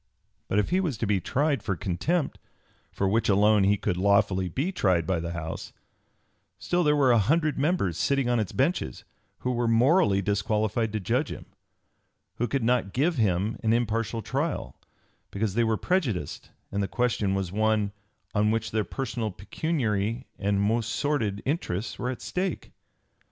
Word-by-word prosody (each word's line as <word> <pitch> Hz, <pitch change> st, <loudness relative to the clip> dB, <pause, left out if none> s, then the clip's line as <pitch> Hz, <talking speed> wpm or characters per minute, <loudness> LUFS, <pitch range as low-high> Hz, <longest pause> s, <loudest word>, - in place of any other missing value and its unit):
But 95 Hz, -, 0 dB
if 105 Hz, -, +1 dB
he 185 Hz, -, +3 dB
was 165 Hz, -, -1 dB
to 115 Hz, -, -1 dB
be 100 Hz, -2 st, +2 dB
tried 140 Hz, -, 0 dB
for 95 Hz, -, -2 dB
contempt, 105 Hz, -, -1 dB, 0.5 s
for 100 Hz, -, -1 dB
which 110 Hz, +3 st, +1 dB
alone 105 Hz, +1 st, +5 dB
he 100 Hz, +1 st, +3 dB
could 90 Hz, -, -1 dB
lawfully 100 Hz, -1 st, +2 dB
be 140 Hz, -, -1 dB
tried 95 Hz, -, +1 dB
by 90 Hz, 0 st, 0 dB
the 85 Hz, +1 st, -4 dB
House, 80 Hz, -2 st, -6 dB, 0.8 s
still 175 Hz, 0 st, 0 dB
there 150 Hz, -1 st, +4 dB
were 135 Hz, -3 st, +4 dB
an 115 Hz, -, +5 dB
hundred 150 Hz, -, +1 dB
members 140 Hz, -, +1 dB
sitting 140 Hz, -2 st, +1 dB
on 120 Hz, -1 st, +2 dB
its 105 Hz, -4 st, -2 dB
benches 135 Hz, -, -1 dB, 0.4 s
who 125 Hz, -, -1 dB
were 120 Hz, -1 st, 0 dB
morally 115 Hz, -, +4 dB
disqualified 105 Hz, +2 st, 0 dB
to 110 Hz, -, 0 dB
judge 125 Hz, +9 st, 0 dB
him, -, -, -7 dB, 0.9 s
who 120 Hz, -, 0 dB
could 135 Hz, -1 st, -1 dB
not 115 Hz, -5 st, +1 dB
give 150 Hz, -, +1 dB
him 100 Hz, 0 st, +1 dB
an 110 Hz, 0 st, +2 dB
impartial 115 Hz, -1 st, 0 dB
trial, 145 Hz, +3 st, -2 dB, 0.5 s
because 100 Hz, 0 st, -2 dB
they 120 Hz, +3 st, +2 dB
were 110 Hz, -1 st, +1 dB
prejudiced 120 Hz, -, -1 dB, 0.2 s
and 100 Hz, -, -1 dB
the 100 Hz, -, 0 dB
question 110 Hz, -5 st, 0 dB
was 95 Hz, -3 st, -2 dB
one 110 Hz, 0 st, +1 dB, 0.4 s
"on 105 Hz, 0 st, +2 dB
which 115 Hz, 0 st, -1 dB
their 110 Hz, -1 st, +1 dB
personal, 120 Hz, -2 st, -3 dB
pecuniary, 115 Hz, -, -2 dB
and 100 Hz, 0 st, +1 dB
most 110 Hz, +2 st, +1 dB
sordid 110 Hz, -8 st, -1 dB
interests 120 Hz, -, -2 dB
were 125 Hz, -, -1 dB
at 130 Hz, -, -5 dB
stake." 185 Hz, -1 st, -3 dB
110 Hz, 170 wpm, -27 LUFS, 100-135 Hz, 0.9 s, alone